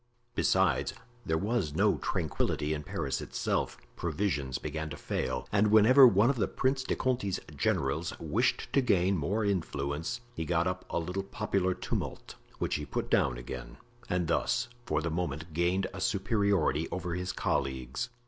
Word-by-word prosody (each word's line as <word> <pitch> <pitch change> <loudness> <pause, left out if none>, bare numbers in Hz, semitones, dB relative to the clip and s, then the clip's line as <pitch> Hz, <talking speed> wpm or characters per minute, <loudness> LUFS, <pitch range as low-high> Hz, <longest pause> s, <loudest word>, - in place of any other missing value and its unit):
Besides, - - +2 0.3
there 80 - +2
was 100 -4 -1
no - - +3
tranquillity 75 +1 -1
in 75 - -3
Paris 70 -2 -3
itself. - - -1 0.2
Provisions 75 -6 -1
began 80 +1 -4
to 75 - -6
fail, 65 -2 -2
and 105 +1 +4
whenever 115 +6 +8
one 110 +3 +5
of 135 - -4
the 110 - +1
Prince 130 0 0
de 130 - -1
Conti's 120 -8 0 0.2
generals 80 +5 0
wished - - 0
to 140 - +5
gain 95 -5 +3
more 100 +7 0
influence 85 - -2
he 80 - -3
got 85 +1 +1
up 90 0 -2
a - - -1
little 90 +3 -2
popular 95 -2 -1
tumult, - - -4 0.2
which - - -1
he - - -4
put - - -3
down 65 -3 +3
again, - - -7 0.3
and 90 -1 +1
thus 85 - +1 0.2
for 75 0 0
the 85 - -1
moment 80 -1 -3
gained 90 +4 +1
a 95 - -6
superiority 100 - +1
over 90 -2 -3
his 90 +1 -2
colleagues. 65 - -2
90 Hz, 160 wpm, -30 LUFS, 75-100 Hz, 0.3 s, whenever